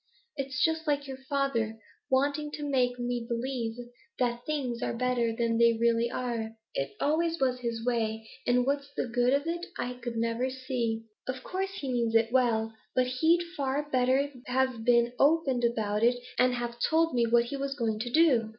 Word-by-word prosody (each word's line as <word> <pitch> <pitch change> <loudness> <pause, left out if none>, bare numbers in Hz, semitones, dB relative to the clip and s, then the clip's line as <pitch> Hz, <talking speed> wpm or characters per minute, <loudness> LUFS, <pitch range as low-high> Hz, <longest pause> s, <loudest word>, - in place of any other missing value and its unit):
It's 275 0 -3
just 320 0 -1
like 285 -1 +1
your 265 -1 -7
father 240 -6 0 0.3
wanting 285 +3 +1
to 295 -1 -4
make 250 -3 +1
me 245 -1 -2
believe 235 -1 -2 0.4
that 240 -1 -1
things 265 -6 -2
are - - -2
better 250 -2 +1
than 230 0 0
they 235 0 +6
really 235 0 +2
are; 235 -3 -3 0.2
it 135 0 -2
always 330 +3 +1
was 255 -2 +1
his 235 -2 -3
way, 225 -2 -1 0.2
and 245 0 +3
what's 280 +1 -1
the - - -1
good 245 +1 +2
of 280 +2 +2
it 340 +1 -2
I 250 0 -4 0.2
never 230 +2 0
could 260 - -3
see. 245 -4 -2 0.2
Of 255 0 -4
course 385 +1 -3
he 275 -9 -3
means 230 -2 0
it 225 0 +4
well, 225 -3 +2 0.2
but 255 - +4
he'd 340 +2 +4
far 280 0 -1
better 260 +2 +2 0.2
have 255 -2 0
been 235 0 +4
open 280 -4 +3
about 215 -3 0
it, 240 +2 +4 0.2
and 250 0 +4
have 240 0 -4
told 325 +4 +2
me 235 -1 +2
what 235 +1 +4
he 245 - -5
was 275 0 -3
going 225 -5 -1
to 240 +2 -3
do.' 255 -6 +4
250 Hz, 185 wpm, -29 LUFS, 235-275 Hz, 0.4 s, they